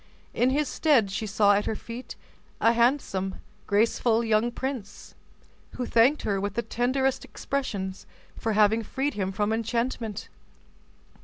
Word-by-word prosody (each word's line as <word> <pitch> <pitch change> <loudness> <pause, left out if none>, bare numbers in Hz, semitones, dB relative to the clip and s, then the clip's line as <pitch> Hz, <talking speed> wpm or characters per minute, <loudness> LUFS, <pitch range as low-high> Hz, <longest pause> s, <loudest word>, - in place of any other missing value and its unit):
In 250 - +2
his 290 +2 +1
stead 255 -11 +2
she 215 +3 -3
saw 205 0 +4
at 205 +1 +1
her 220 - -1
feet 235 +4 -8 0.4
a 230 - +4
handsome, 235 -6 +1 0.3
graceful 225 +2 +2
young 225 +1 +2
prince, 250 -5 -6 0.6
who 250 - -3
thanked 240 +6 +3
her 200 -2 0
with 200 0 -3
the 235 - 0
tenderest 260 +3 0
expressions 200 -9 -4 0.3
for 225 - -2
having 215 +2 +4
freed 270 +6 -2
him 190 -2 -2
from 210 +2 0
enchantment. 230 -1 -2
225 Hz, 140 wpm, -26 LUFS, 205-250 Hz, 0.6 s, saw